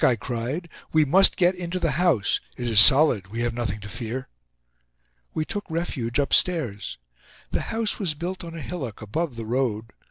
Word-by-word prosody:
I 125 - +5
cried. 125 - -4 0.2
"We 155 -1 +4
must 190 +7 +5
get 180 0 +3
into 180 0 -4
the 165 -3 0
house. 155 - +1 0.2
It 120 - -4
is 110 -3 +5
solid—we 115 -6 +6
have 120 -1 -1
nothing 115 -2 -3
to 105 - -8
fear." 120 +4 -5 1.1
We 155 - -1
took 205 +3 -4
refuge 155 -8 -2
upstairs. 140 - +1 0.5
The - - -1
house 225 -1 0
was 175 -7 0
built 180 +5 -5
on 165 -1 -8
a 165 - -6
hillock 135 - -6
above 145 +6 -3
the 115 -1 -6
road. 115 -2 -2
135 Hz, 170 wpm, -24 LUFS, 115-170 Hz, 1.1 s, solid—we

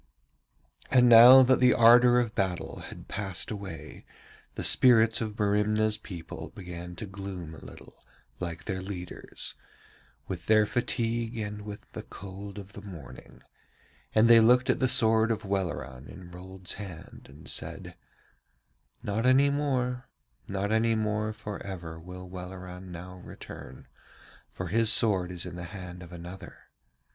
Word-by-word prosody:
And 125 -2 +5
now 120 +3 +10
that 130 0 +3
the 125 0 +5
ardour 120 +1 +7
of 120 -3 0
battle 95 -5 -2
had - - -11
passed 95 -1 -4
away, 100 -6 -8 0.5
the - - -4
spirits 115 -3 +5
of 110 -1 -4
Merimna's 105 +1 +1
people 90 -6 -8
began 90 -1 -8
to 110 - -6
gloom 95 -4 -7
a 80 - -12
little, - - -14 0.4
like 85 -1 -5
their 95 -2 -4
leader's, 95 -2 -7 0.7
with - - -6
their 110 -1 +5
fatigue 115 0 -2
and 105 -1 -5
with 105 0 -8
the - - -7
cold 100 +1 -10
of 100 -1 -10
the 100 - -9
morning; 85 -11 -12 0.7
and 110 +1 +6
they 115 -1 +8
looked 125 +3 +5
at - - -2
the 130 - +2
sword 115 -3 +3
of 110 -1 -2
Welleran 75 -9 -3
in 90 -2 -12
Rold's 90 +1 -6
hand 90 -5 -10
and 70 +4 -14
said: - - -4 1.1
'Not 110 +4 -1
any 135 +2 +5
more, 125 -4 -1 0.4
not 100 +1 -2
any 110 +1 +2
more 105 0 -1
for 105 -1 -7
ever 85 -4 -7
will 90 +2 -10
Welleran 90 0 -9
now 90 +2 -9
return, 75 -6 -11 0.6
for 90 -1 -6
his 115 +3 +3
sword 95 -6 +3
is 90 -1 -4
in 90 -1 -7
the 85 - -6
hand 90 -1 -9
of 90 -1 -11
another. 90 +2 -10
100 Hz, 150 wpm, -28 LUFS, 90-115 Hz, 1.1 s, now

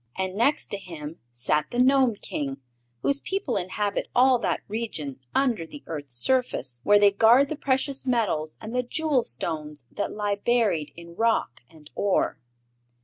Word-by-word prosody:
And 190 0 -2
next 275 +8 +2
to 200 - -2
him 165 -4 -8
sat 140 +5 0
the 240 - -5
Gnome 260 -2 +4
King, 140 -8 -4 0.5
whose 280 0 +1
people 380 -10 -2
inhabit 200 +3 -1
all 255 0 +5
that - - -1
region 180 - -4 0.2
under 250 -9 +2
the 285 - -11
earth's 145 -6 -5
surface, 130 - 0
where 205 +6 +6
they 205 0 +6
guard 235 +7 +5
the 310 - -2
precious 275 0 0
metals 210 - 0
and 220 +1 -7
the 250 - +2
jewel 280 0 0
stones 150 - -5
that 205 - -3
lie 205 -1 -1
buried 205 -9 +1
in 170 0 -12
rock 225 - +1
and 155 -2 -17
ore. 200 -2 0
205 Hz, 160 wpm, -26 LUFS, 155-250 Hz, 0.5 s, where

